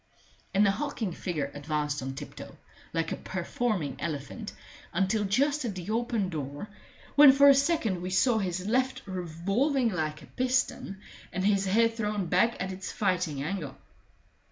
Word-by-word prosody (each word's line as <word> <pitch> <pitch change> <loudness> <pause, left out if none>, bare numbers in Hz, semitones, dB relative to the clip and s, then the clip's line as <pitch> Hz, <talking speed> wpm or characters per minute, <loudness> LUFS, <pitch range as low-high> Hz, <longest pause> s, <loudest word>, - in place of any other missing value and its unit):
And 200 +2 +4
the 200 - +4
hulking 240 -4 -3
figure 155 -5 -3
advanced 150 0 -2
on 135 +1 -5
tiptoe, 145 +1 -9 0.3
like 165 -1 -1
a - - 0
performing 190 - -2
elephant, 165 - -4 0.4
until 195 +4 +1
just 280 +9 +1
at 220 -6 -3
the 185 +3 -5
open 230 -4 0
door, 145 +4 -5 0.4
when 290 -1 +9
for 280 +1 +6
a - - +9
second 270 - +1
we 180 - -3
saw 220 +5 +3
his 185 -2 -2
left 260 +4 0
revolving 195 - 0
like 155 -5 -3
a - - -11
piston 250 -6 -1 0.3
and 185 +2 -2
his 200 -1 +3
head 230 +4 +3
thrown 210 -3 -2
back 185 +8 +2
at 190 +1 -2
its 190 0 -6
fighting 180 - 0
angle. 155 -4 -4
195 Hz, 155 wpm, -29 LUFS, 170-230 Hz, 0.4 s, when